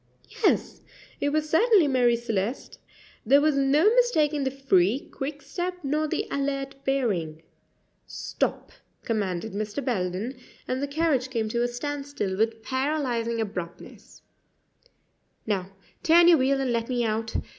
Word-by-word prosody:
Yes, - - +1 0.4
it 285 - +1
was 305 +1 0
certainly 370 +1 +4
Marie 250 -3 +3
Celeste. 230 0 -3 0.4
There 275 +5 +5
was 300 0 +2
no 275 +4 +3
mistaking 310 - +2
the - - +2
free, 260 -4 +1
quick 280 +1 -5
step 350 +6 -3
nor 305 +3 0
the - - -2
alert 275 -1 -2
bearing. 185 - -1 0.6
"Stop!" - - -3 0.3
commanded 205 -2 -2
Mr. 215 +6 -4
Belden, 215 +3 -2 0.3
and 255 +1 -2
the 285 - -1
carriage 280 -4 0
came 225 -4 -2
to 235 +2 -1
a 240 - +2
standstill 280 -5 -4
with 225 +2 -1
paralyzing 260 -4 -1
abruptness 180 -5 -7 1.2
"Now, 190 -4 -1 0.3
turn 340 +1 +6
your 340 -4 +7
wheel 270 +1 +2
and 265 -2 0
let 230 +1 -1
me 245 -2 0
out. 220 +1 -2
260 Hz, 135 wpm, -26 LUFS, 220-285 Hz, 1.2 s, your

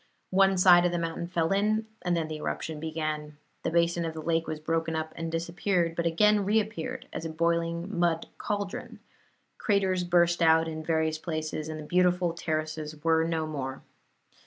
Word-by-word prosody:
One 195 0 +4
side 180 -1 +7
of 175 - +2
the 175 - -1
mountain 165 0 -3
fell 170 -1 0
in, 215 +3 +2 0.2
and 175 -1 0
then 160 -1 -1
the 155 -1 -5
eruption 155 0 -4
began. 155 -1 -4 0.2
The - - -1
basin 170 +1 +2
of 165 -1 -4
the - - -5
lake 165 0 0
was 155 - -4
broken 165 +1 -1
up 160 0 -3
and 165 0 -4
disappeared, 170 +1 0
but 170 0 0
again 210 +5 +4
reappeared 220 +5 -1
as - - -4
a 165 - -3
boiling 170 +3 -1
mud 170 -1 +1
cauldron; 205 -2 -4 0.6
craters 190 -3 +1
burst 175 0 +3
out 160 0 +5
in 155 -1 -5
various 160 -1 0
places, 155 -1 -4
and 155 0 -5
the 150 - -7
beautiful 180 0 +2
terraces 155 -2 -4
were 160 0 +3
no 165 -1 -1
more. 135 -4 -5
165 Hz, 180 wpm, -28 LUFS, 160-180 Hz, 0.6 s, side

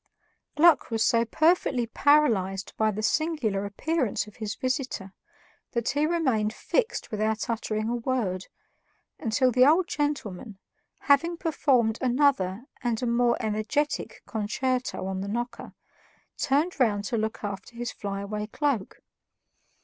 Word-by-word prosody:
Gluck 310 -2 +5
was 225 -1 +1
so 230 -2 +3
perfectly 285 -2 +2
paralyzed 225 -8 +2
by 220 0 +2
the 215 +1 -3
singular 245 -9 0
appearance 260 +4 -1
of 210 - -15
his 215 -1 -4
visitor 255 -7 -3 0.6
that 235 -2 0
he 295 +3 +1
remained 260 -11 +1
fixed 475 - -1
without 215 0 -1
uttering 215 -1 -2
a 240 - 0
word, 225 -7 -2 0.7
until 255 +3 +2
the 250 +1 +5
old 330 +6 +5
gentleman, 235 - -3 0.4
having 335 +5 +3
performed 265 - +1
another 250 -5 +2 0.2
and 240 -1 -1
a - - +1
more 235 0 +2
energetic 220 +8 -2
concerto 245 0 -2
on 190 0 -3
the 195 - -4
knocker, 240 +4 -4 0.6
turned 295 +5 0
round 210 -5 +2
to 235 - -2
look 220 +1 -3
after 200 +3 -6
his 240 +1 -4
flyaway 200 +1 -4
cloak. 270 -4 -2
235 Hz, 130 wpm, -27 LUFS, 215-280 Hz, 0.7 s, Gluck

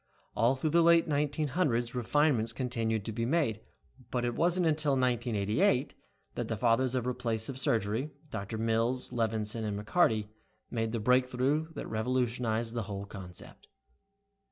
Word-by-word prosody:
All 120 +4 +3
through 150 +4 -1
the 170 +2 +5
late 170 0 +5
1900s 145 -4 0
refinements 125 -1 +2
continued 115 -4 -1
to 115 - -3
be 115 +2 -3
made, 120 -5 +1 0.5
but 120 0 -1
it 120 - -1
wasn't 175 +4 +2
until 155 -2 +2
1988 125 - +1 0.4
that - - -3
the 110 - -2
fathers 120 +3 +2
of 125 -2 -1
replacive 120 0 -2
surgery, 115 +3 0 0.2
Doctors 110 +1 -4
Mills, 115 +3 0
Levinson 110 -1 -1
and 105 -1 -2
McCarty 110 -3 +2 0.4
made 115 -1 -1
the 115 - -2
breakthrough 130 +6 +1
that - - -5
revolutionized 115 0 -1
the 120 - -1
whole 100 0 -4
concept. 95 -3 -10
120 Hz, 140 wpm, -30 LUFS, 110-135 Hz, 0.5 s, the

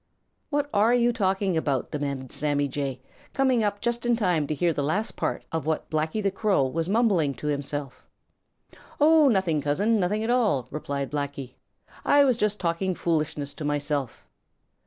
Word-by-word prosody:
"What 290 -1 0
are 215 +4 +4
you 240 0 +3
talking 195 -4 0
about?" 145 -5 -1
demanded 140 -3 -4
Sammy 145 -1 0
Jay, 135 -1 -4 0.3
coming 260 -4 +2
up 205 -1 -1
just 235 0 -1
in 240 -1 +2
time 180 -9 +1
to 155 - -2
hear 170 +2 +1
the 145 - -2
last 190 +11 -1
part - - -3
of 160 -1 -3
what 160 - -2
Blacky 160 +7 -1
the 195 - +1
Crow 195 -6 +1
was 165 +6 -2
mumbling 195 - +2
to 125 - -9
himself. 145 -2 -3 1.0
"Oh 310 0 +6
nothing, 190 - +2
Cousin, 200 +11 +1
nothing 205 +4 0
at 230 - 0
all," 205 - +2
replied 140 -2 -4
Blacky. 140 -3 -4 0.5
"I 285 0 +5
was 255 -4 +3
just 210 -2 0
talking 180 +2 -1
foolishness 155 -4 -2
to 155 - -8
myself." 145 -4 -2
165 Hz, 170 wpm, -26 LUFS, 145-215 Hz, 1.0 s, Oh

